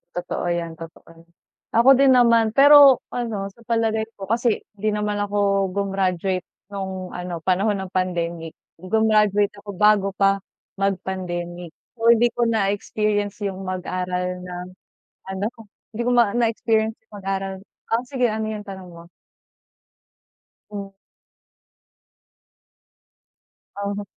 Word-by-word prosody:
Totoo 175 0 -3
yan, 170 -2 -2
totoo 165 0 -12
yan. 165 0 -18 0.4
Ako 235 +3 +5
din 270 -1 +5
naman, 230 -3 +4
pero 280 0 +8
ano, 220 -5 -3
sa 230 +3 -21
palagay 225 -1 0
ko 195 -1 -9
kasi, 230 0 +1 0.2
'di 215 +1 -1
naman 210 0 -1
ako 200 -1 +1
gumraduate 190 -2 -1 0.2
no'ng 190 -2 -5
ano, 180 -2 -6
panahon 195 +3 +1
ng 190 - -6
pandemic, 170 -3 -2 0.2
gumraduate 210 +1 +2
ako 205 0 -9
bago 210 0 +4
pa, 195 0 +3 0.4
mag-pandemic. 180 -3 -3 0.2
So, 230 +1 +6
hindi 235 +1 +3
ko 240 0 -1
na-experience 205 -1 -1
yung 195 -1 -4
mag-aral 180 0 -3
ng 180 0 -7 0.6
ano 190 +1 -3
ko? 230 - -13 0.3
Hindi 230 - -2
ko 245 - +1
ma 235 -4 +3
na-experience 225 -1 +1
yung - - -24
mag-aral 195 0 -2 0.3
ah, 230 +2 0
sige 250 -1 0
ano 220 0 -2
yung 210 -1 -7
tanong 190 -2 -9
mo? 170 0 -13 1.6
Hmm. 200 -1 -7 2.9
Uh-huh. 200 0 -3
200 Hz, 125 wpm, -22 LUFS, 185-220 Hz, 2.9 s, pero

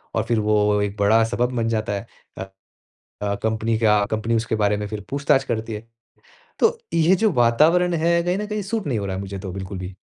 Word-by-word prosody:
और - - +1
फिर 115 -1 +1
वो 105 -1 +2
एक 100 0 -2
बड़ा 110 +3 +4
सबब 120 +2 -1
बन 115 -1 0
जाता 110 -2 -1
है 100 - -5 0.3
अ, - - -5 0.8
अ, 100 -1 -1
कंपनी 110 0 0
का 105 -2 +3
कंपनी 110 +2 0
उसके 115 0 -1
बारे 105 -1 +1
में 105 0 -4
फिर 105 0 -6
पूछताछ 140 -1 +2
करती 115 -3 -3
है। 110 +2 -8 0.7
तो 460 +1 +2 0.2
ये 165 +3 +4
जो 215 +2 +2
वातावरण 155 +9 +3
है, 170 +1 +2
कहीं 180 +2 -1
न 210 - -3
कहीं 210 -1 -3
सूट 210 -1 -3
नहीं 120 -6 0
हो 100 - -3
रहा 95 - -3
है 95 - -4
मुझे 100 0 -6
तो 95 -1 -6
बिल्कुल 95 0 -6
भी। 90 +1 -7
115 Hz, 225 wpm, -22 LUFS, 105-150 Hz, 0.8 s, बड़ा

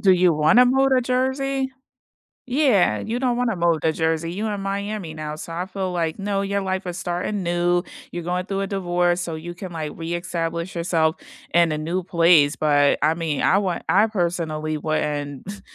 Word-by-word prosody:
Do 190 -3 +5
you 180 -1 +4
wanna 155 +12 +5
move 270 +2 +3
to 255 - +4
Jersey? 265 +2 0 0.8
Yeah, 245 - +3
you 230 - -3
don't 250 -2 +1
wanna 245 -3 0
move 170 -3 +1
to 160 - +2
Jersey, 160 +1 -1
you 210 +4 -2
in 205 -2 -3
Miami 200 -3 -3
now, 155 -1 -5
so 165 +2 -8
I 180 +2 -2
feel 190 -1 -4
like, 165 -1 -2
no, 200 0 -1
your 200 0 -1
life 190 0 -2
is 175 -1 -4
starting 180 +3 -2
new, 175 0 +1 0.3
you're 175 -1 -5
going 180 +1 -2
through 195 -1 -2
a 195 - -2
divorce, 175 -2 0
so 170 -2 -4
you 170 +2 -7
can 185 +1 -8
like 155 -3 -4
re-establish 170 +1 -3
yourself 165 -1 +1 0.4
in 170 -1 +4
a 155 - -1
new 170 +4 -2
place, 165 -4 +4
but 145 -2 +3
I 155 +2 +3
mean, 160 -4 -2
I 195 - +4
want 185 -4 -1
I 210 +3 +5
personally 165 -6 -2
wouldn't, 150 +4 -3
175 Hz, 190 wpm, -22 LUFS, 160-200 Hz, 0.8 s, Do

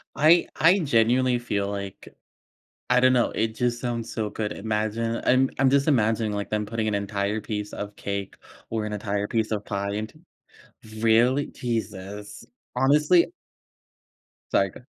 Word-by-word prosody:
I 160 +4 +5
I 175 +5 +5
genuinely 125 -3 +2
feel 100 -4 -2
like 100 -1 -6 0.8
I 125 0 +5
don't 130 0 +5
know, 120 -2 +2
it 110 0 -1
just 120 0 0
sounds 115 -2 -3
so 110 -2 -2
good, 105 0 -3
imagine 110 +2 -2
I'm 130 +1 +4
I'm 135 -1 +5
just 140 +2 +2
imagining, 110 -5 +2
like, 100 0 -3
them 105 0 -1
putting 110 +1 -2
an 105 - 0
entire 100 +1 -2
piece 105 -1 -5
of 105 0 -6
cake 100 -1 -4 0.3
or 110 -1 -2
an 105 - -4
entire 105 0 -2
piece 110 0 -1
of 105 -1 -2
pie 100 0 -2
into 110 +8 -5 0.8
Really? 120 +5 +3
Jesus. 105 -4 -5 0.3
Honestly 150 - +4 1.2
Sorry, - - +3
go - - -13
ah - - -19
110 Hz, 155 wpm, -25 LUFS, 105-125 Hz, 1.2 s, I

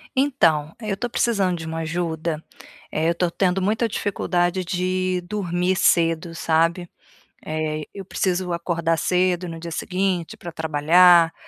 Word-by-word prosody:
Então, 165 - +2
eu 215 -3 -2
estou 245 +5 -4
precisando 200 -7 +1
de 160 - -6
uma 160 0 -4
ajuda, 165 -1 -3 0.5
eh, 160 +2 +1
eu - - +2
tô 175 0 0
tendo 185 +1 0
muita 220 +4 +1
dificuldade 185 -3 -1
de 185 0 -1
dormir 180 -1 -1
cedo, 165 -1 +2
sabe. 165 +2 +1 0.6
Eh, 155 0 -2
eu 195 - -8
preciso 185 -1 -1
acordar 170 -1 0
cedo 180 +1 +1
no 165 -1 -7
dia 170 0 -7
seguinte 185 -1 -2
pra 170 - -8
trabalhar, 165 +2 +5
175 Hz, 140 wpm, -22 LUFS, 165-185 Hz, 0.6 s, trabalhar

